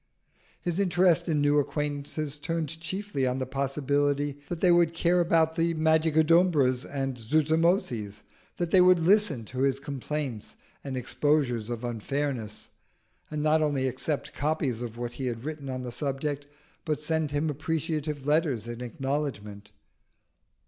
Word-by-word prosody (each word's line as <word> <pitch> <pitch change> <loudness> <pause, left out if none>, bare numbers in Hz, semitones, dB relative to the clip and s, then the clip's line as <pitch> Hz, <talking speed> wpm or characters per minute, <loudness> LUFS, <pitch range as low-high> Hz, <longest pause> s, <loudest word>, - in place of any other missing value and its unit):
His 175 +1 -2
interest 175 -2 +3
in 150 -2 +2
new 145 0 +4
acquaintances 145 0 -3
turned 160 0 -3
chiefly 170 -4 -2
on 125 +1 0
the 130 - -2
possibility 140 +1 0
that 175 - -3
they 180 0 +4
would 170 -1 +4
care 175 +1 +3
about 165 -2 +3
the 165 0 +1
Magicodumbras 160 -3 +3
and 135 -2 -3
Zuzumotzis; 145 - +1 0.3
that 175 -1 -2
they 185 - +7
would 180 0 +6
listen 170 - +2
to 125 +4 -6
his 135 0 +2
complaints 140 -4 -5 0.3
and 135 -2 -4
exposures 125 -3 0
of 120 0 -4
unfairness, 120 -1 -3 0.6
and 150 -1 -3
not 155 +1 +3
only 145 -3 +1
accept 140 +3 -2
copies 145 -6 -1
of 120 -1 -6
what 120 0 -4
he 130 +1 -4
had 115 -1 -4
written 150 -2 -5
on 130 -1 -4
the 125 - -5
subject, 140 +1 -3 0.4
but 155 -3 -1
send 160 0 0
him 145 +2 0
appreciative 155 -1 -3
letters 145 -7 +1
in 120 +1 -6
acknowledgment. 125 -6 -4
145 Hz, 145 wpm, -28 LUFS, 130-160 Hz, 0.6 s, they